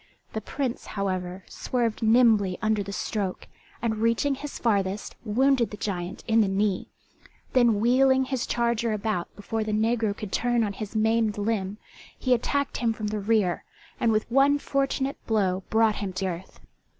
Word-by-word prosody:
The 220 - -2
Prince, 260 +2 -3
however, 185 -1 -2
swerved 235 -3 -2
nimbly 220 -5 +4
under 215 -2 +1
the 200 0 -5
stroke, 200 -1 -3 0.4
and 220 -2 0
reaching 230 +5 +2
his 285 +2 -6
farthest, 200 -3 0
wounded 245 +2 +2
the 210 - -8
giant 180 -4 -4
in 225 0 +4
the 210 - +3
knee; 195 0 0 0.7
then 240 -5 +4
wheeling 260 +3 +4
his 260 -2 -2
charger 235 -1 0
about 210 -4 -2
before 220 +2 -3
the 215 0 -3
negro 220 -1 +1
could 210 -3 -6
turn 240 +1 +1
on 205 -2 -2
his 210 +1 -7
maimed 220 -1 +2
limb 205 -2 -1 0.4
he 255 - +2
attacked 280 +4 0
him 230 -2 +1
from 215 -1 -4
the 210 0 -2
rear, 205 -4 +1 0.4
and 230 - +3
with 215 0 +1
one 275 +3 +5
fortunate 275 -1 -1
blow 195 -4 +1
brought 220 -1 +3
him 195 -2 -4
to 190 +1 -2
earth. 180 0 -5
220 Hz, 165 wpm, -26 LUFS, 200-240 Hz, 0.7 s, one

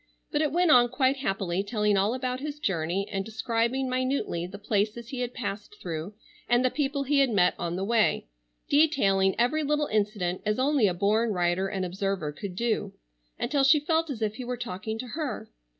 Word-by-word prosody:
But 295 - +1
it 300 -3 +1
went 350 +1 +3
on 240 -2 +6
quite 260 +2 +1
happily 195 -7 -1
telling 210 0 +1
all 200 +5 +2
about 255 -1 -2
his 295 +1 -5
journey 190 - -1
and 195 -1 -1
describing 230 +4 -1
minutely 255 -9 -1
the 195 +2 -9
places 210 +3 -1
he 265 -2 -5
had 245 -1 -2
passed 210 -4 -5
through 170 +3 -5 0.3
and 240 +1 +3
the 255 - +2
people 280 -1 -1
he 280 +1 +2
had 275 -2 +4
met 180 -5 +3
on 170 0 -2
the 190 - -2
way; 220 - +2 0.4
detailing 200 -11 +3
every 250 +7 +2
little 300 0 +1
incident 205 -6 -1
as 210 0 0
only 265 -3 +3
a 180 - -1
born 215 +4 +2
writer 180 +1 +1
and 190 -1 -2
observer 190 -3 -2
could 180 +5 -7
do, 215 -2 -1 0.4
until 280 +2 +1
she 280 +2 +6
felt 320 +2 0
as 235 -5 -3
if 215 0 -2
he 255 - -5
were 245 0 -4
talking 220 -1 -5
to 250 +2 -6
her. 290 - -4
225 Hz, 200 wpm, -27 LUFS, 195-265 Hz, 0.4 s, on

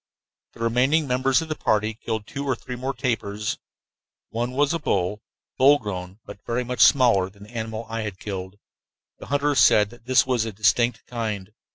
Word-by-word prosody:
The - - -13
remaining 130 +7 +2
members 130 +4 +2
of - - -8
the 155 - -2
party 110 -3 0
killed 110 -1 -4
two 140 +5 -5
or 135 -2 0
three 125 +2 -7
more 130 +2 -4
tapirs. 105 -5 -2 0.7
One 120 +2 -2
was 145 +3 +2
a 165 - -1
bull, 100 - -1 0.4
full 140 +3 +7
grown 95 -5 -6
but - - -11
very 120 +1 -1
much 125 0 -5
smaller 115 -9 +5
than 100 +1 -16
the 105 - -14
animal 110 0 -4
I 115 0 -3
had 105 -3 -5
killed. 95 -1 -6 0.6
The - - -10
hunters 145 -1 +1
said 105 -2 +5
that 120 -1 -16
this 130 0 +4
was 125 -4 +1
a 115 - -4
distinct 110 +4 +1
kind. 110 -5 -4
115 Hz, 190 wpm, -24 LUFS, 105-130 Hz, 0.7 s, full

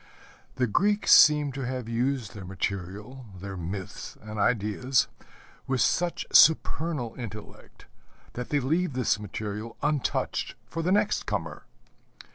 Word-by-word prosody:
The 125 - +1
Greeks 205 - +2
seem 150 -1 +7
to 135 +1 -6
have 125 -2 -4
used 120 -1 -1
their 105 - -8
material, 100 +7 -5
their 100 +1 -6
myths 95 +2 -6
and 110 0 -7
ideas, 120 +4 +1 0.6
with 130 -1 0
such 175 +6 +1
supernal 155 -5 +4
intellect 110 -3 -10 0.5
that 125 0 -5
they 145 - +2
leave 155 +4 0
this 125 -3 +1
material 105 +2 -6
untouched 150 -2 -1
for 165 - -4
the 175 +3 0
next 205 - +1
comer. - - -4
125 Hz, 125 wpm, -27 LUFS, 105-145 Hz, 0.6 s, seem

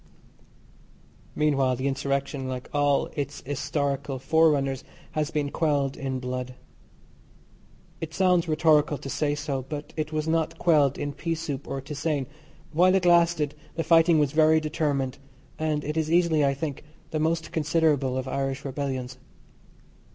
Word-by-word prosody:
Meanwhile 135 -4 +2
the 130 +3 -2
insurrection, 140 0 -2
like 130 -1 -6
all 145 -1 +2
its 145 -1 -4
historical 140 0 -2
forerunners, 135 -1 +2 0.3
has 155 -1 -1
been 150 -3 -2
quelled 145 -4 0
in 135 -1 -3
blood. 125 0 -4 1.4
It 160 -1 -5
sounds 180 -2 +3
rhetorical 155 -2 +3
to 135 0 -8
say 145 -1 0
so, 145 -3 -3
but 145 +3 -7
it 155 0 -3
was 155 0 -2
not 160 -1 0
quelled 150 -6 +3
in 145 0 -3
peasoup 160 -5 -4
or 135 0 -4
tisane. 145 0 -2 0.5
While 180 +4 +5
it 190 -2 +1
lasted 170 -4 +4 0.2
the 165 - -1
fighting 165 0 +5
was 145 -3 +2
very 155 +1 +5
determined, 150 -4 -1 0.4
and 155 -2 0
it 150 +1 -3
is 160 -1 0
easily, 170 -3 +3
I 140 -1 +2
think, 145 -1 -4 0.3
the 155 - -1
most 160 0 0
considerable 150 -5 +1
of 130 0 -3
Irish 135 0 -2
rebellions. 130 -2 -4
145 Hz, 145 wpm, -26 LUFS, 135-160 Hz, 1.4 s, While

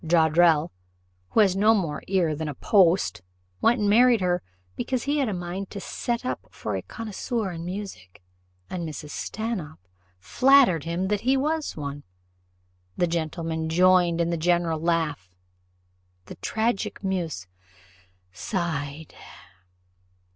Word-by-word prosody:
Joddrell, 160 -1 +4 0.6
who - - +4
has 195 -3 +3
no 215 +3 +5
more 170 -8 -2
ear 180 -5 +1
than 155 +1 -4
a 150 - -5
post, 185 - +3 0.4
went 240 +2 +3
and 205 - +1
married 235 +3 +5
her, 180 -1 0 0.3
because 255 - -2
he 290 +1 0
had 270 -5 +1
a - - -2
mind 180 +1 -5
to 200 - -6
set 240 +5 -3
up - - -4
for - - -5
a - - -2
connoisseur 220 -1 -4
in 165 -1 -6
music; 175 - -7 0.4
and 180 -2 -4
Mrs. 150 -1 -8
Stanhope 175 - -5 0.3
flattered 250 - +4
him 175 +3 -2
that 205 -1 0
he 260 +3 +2
was 305 - -1
one." 145 -1 -5 1.0
The - - +3
gentlemen 160 -1 -2
joined 175 0 +4
in 170 0 +1
the 170 - 0
general 170 -1 +1
laugh: 160 - -1 1.0
the - - -9
tragic 220 -2 -2
muse 170 - -2 0.9
sighed. 160 - -4
175 Hz, 135 wpm, -25 LUFS, 160-210 Hz, 1.0 s, no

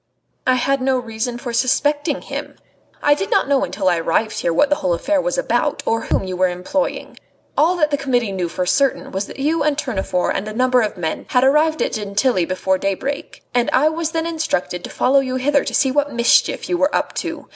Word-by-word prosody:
"I 255 - +4
had 275 +2 0
no 260 0 +2
reason 235 0 -4
for 240 -1 -6
suspecting 285 +4 +1
him. - - -6 0.5
I 290 - +5
did 195 -9 -3
not - - +2
know 280 -1 +2
until 195 -3 -2
I 175 -2 +3
arrived 215 +6 0
here 170 - 0
what 275 - +3
the 290 - +3
whole 180 -2 0
affair 285 - 0
was - - -2
about, - - 0
or 225 0 +1
whom - - 0
you 185 -1 -4
were 185 +1 +2
employing. 180 +11 -3 0.4
All 330 +5 +3
that 305 -4 +1
the 285 - 0
Committee 245 -6 0
knew 180 -3 -2
for 180 +2 -2
certain 275 +8 +1
was 195 +1 -3
that - - -10
you 305 +4 0
and 295 -2 +1
Tournefort 195 -10 -1
and 195 - -3
a 215 - -5
number 255 +1 +3
of 215 -2 -2
men 160 -3 -4
had 250 -1 +3
arrived 305 +4 +3
at - - -2
Gentilly 205 -1 0
before 185 +1 -1
daybreak, 230 +10 -3
and 245 -1 +2
I 290 +4 +4
was 320 0 -2
then 325 0 -2
instructed 310 - -2
to - - -8
follow 270 +2 +3
you 260 -1 -2
hither 280 +2 +2
to - - -4
see 265 - +3
what 290 +1 0
mischief 235 0 +2
you 355 - -1
were 285 +2 +2
up - - -1
to. - - -5
255 Hz, 225 wpm, -19 LUFS, 200-290 Hz, 0.5 s, I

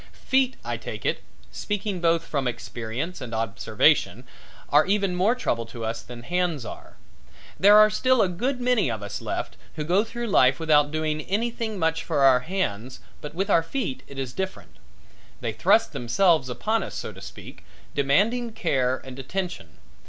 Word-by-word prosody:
Feet, 260 -1 +2
I - - -2
take - - -7
it, - - 0 0.3
speaking 205 -3 -3
both 165 -1 +2
from 140 -4 -1
experience 120 +7 -5
and 115 -3 -5
observation, 110 -2 +1 0.5
are 150 +4 +5
even 195 -2 +1
more 200 +7 +3
trouble 115 - -2
to 115 -1 -6
us 115 +1 -3
than 120 0 -10
hands 175 -5 -1
are. - - -10 0.6
There 205 +2 +8
are 215 0 +7
still 255 +3 +3
a - - +2
good 245 +9 -2
many 245 - +2
of 110 -3 -4
us 100 0 -5
left - - -4 0.2
who 155 - -3
go 180 +7 +2
through 235 +1 -5
life 130 - +4
without 150 -2 +4
doing 155 0 -1
anything 225 +1 -2
much 160 -2 0
for 150 -4 -1
our 135 -2 +6
hands 130 - -3 0.2
but 150 +1 -8
with 195 +3 -1
our 165 - +5
feet 175 - -3
it 140 - -11
is 130 -2 -4
different. 190 +4 -5 0.6
They - - -3
thrust - - +3
themselves 155 +3 +2
upon 220 - 0
us - - -6
so - - -5
to - - -13
speak, - - -11 0.3
demanding 210 - +1
care 130 -9 0
and 130 0 -9
attention. 170 - -5
165 Hz, 175 wpm, -25 LUFS, 130-205 Hz, 0.6 s, There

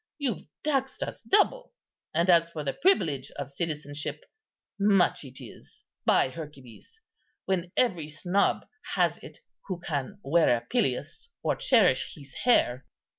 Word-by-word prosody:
You've 255 - -2 0.2
taxed 270 -3 0
us - - -6
double; 485 +5 +2 0.4
and 170 +3 +1
as 170 -2 +5
for 160 -3 -5
the 135 -2 -1
privilege 160 - +2
of 140 -1 -5
citizenship, 150 -1 -4 0.6
much 200 -5 +3
it 135 -1 -11
is, 125 -5 -13 0.2
by - - +4
Hercules, 150 - -11 0.5
when 180 -2 -1
every 175 -11 +2
snob 175 +6 0 0.3
has - - +2
it - - -13 0.3
who 185 -3 -3
can 155 +3 -3
wear 155 -4 +4
a - - -7
pileus 155 - -2 0.2
or - - +1
cherish 200 - +3
his 140 -3 -13
hair." 130 - +2
165 Hz, 135 wpm, -28 LUFS, 140-205 Hz, 0.6 s, as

